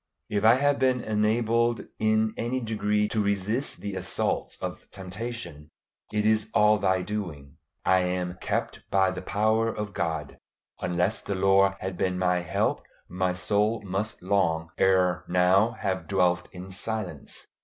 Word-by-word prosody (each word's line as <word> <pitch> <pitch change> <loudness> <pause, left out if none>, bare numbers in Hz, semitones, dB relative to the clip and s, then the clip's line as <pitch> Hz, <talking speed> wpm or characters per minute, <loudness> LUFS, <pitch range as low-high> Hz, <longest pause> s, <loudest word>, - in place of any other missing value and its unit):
If 105 -1 0
I 110 +2 +7
have 145 +2 +2
been 130 -1 +2
enabled 115 +2 +1 0.2
in 110 0 +2
any 120 +3 -1
degree 105 -2 0
to 110 - 0
resist 100 +6 -1
the 100 -1 -4
assaults 95 - -1
of - - -6
temptation, 95 -5 -7 0.4
it 105 0 0
is 110 0 +2
all 105 0 +5
Thy 95 -1 +1
doing. 85 -10 -5 0.3
I 95 - +5
am 90 0 -2
"kept - - -2
by 95 -1 +3
the 90 -1 -5
power 110 +4 +1
of 105 -2 -5
God." 80 -3 -3 0.4
Unless 90 +4 0
the 100 - -3
Lord 95 +1 +4
had 95 -1 -4
been 90 -1 0
my 90 -1 +2
help, 90 - 0 0.3
my 90 0 -1
soul 105 +4 0
must 100 +1 -3
long 85 -4 +1
ere 90 -2 +3
now 90 +5 +3
have 95 -4 -3
dwelt 90 -2 +1
in 95 +1 -9
silence. 95 -5 -5
100 Hz, 150 wpm, -27 LUFS, 90-110 Hz, 0.4 s, I